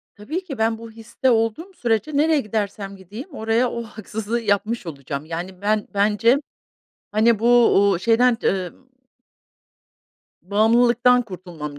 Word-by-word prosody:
Tabii 305 - -5
ki 275 -9 -7
ben 225 0 +1
bu 230 0 -10
histe 230 +3 -2
olduğum 230 - 0
sürece 235 - -1
nereye 310 +1 +3
gidersem 205 -3 -4
gideyim, 210 - -10
oraya 225 +2 +1
o 235 - -4
haksızlığı 220 +1 -5
yapmış 215 -1 -1
olacağım. 140 -1 -6
Yani, 180 +3 -6
ben 210 0 0
bence, 215 +6 +3 0.7
hani, 220 +1 +3
bu, 230 - -1 0.4
uuu, 185 - +1
şeyden, 230 +4 +3
emm 190 +6 -2 1.6
Bağımlılıktan 235 +5 +3
kurtulmam 175 -8 -8
220 Hz, 125 wpm, -22 LUFS, 200-235 Hz, 1.6 s, nereye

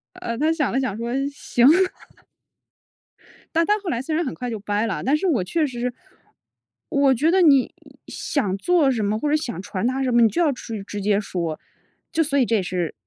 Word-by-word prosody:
呃， 235 0 -5
他 310 +4 +2
想 310 -4 0
了 265 - +1
想 255 -7 -2
说： 230 +1 -4 0.2
“行。“ 245 -3 +1 1.9
但 330 +1 +3
但 420 +3 +2
后 395 -3 -5
来 240 -5 -1
虽 310 +4 -3
然 335 +1 0
很 260 - -3
快 250 -1 -5
就 225 -2 -4
掰 205 +1 -1
了 - - -2
啊， - - -5
但 275 +4 +2
是 380 - -1
我 255 - +1
确 310 - 0
实 245 -3 -7
是 250 0 -1 1.0
我 280 -1 +3
觉 295 +7 +2
得 375 +1 +4
你 280 -7 +4 0.3
想 200 -10 -2
做 315 - +3
什 230 -4 -1
么、 205 +1 0
或 295 - -1
者 300 - +3
想 255 - -3
传 200 +1 -4
达 265 +1 -1
什 255 - 0
么， 240 0 +4
你 225 - +6
就 340 - -1
要 315 -4 +3
去 225 -4 -7
直 205 +1 -6
接 205 0 +2
说。 170 -6 -4 0.5
就 325 - +1
所 280 -2 -1
以 265 - +4
这 230 - +1
也 - - 0
是 180 -2 -3
250 Hz, 245 characters per minute, -22 LUFS, 210-300 Hz, 1.9 s, 你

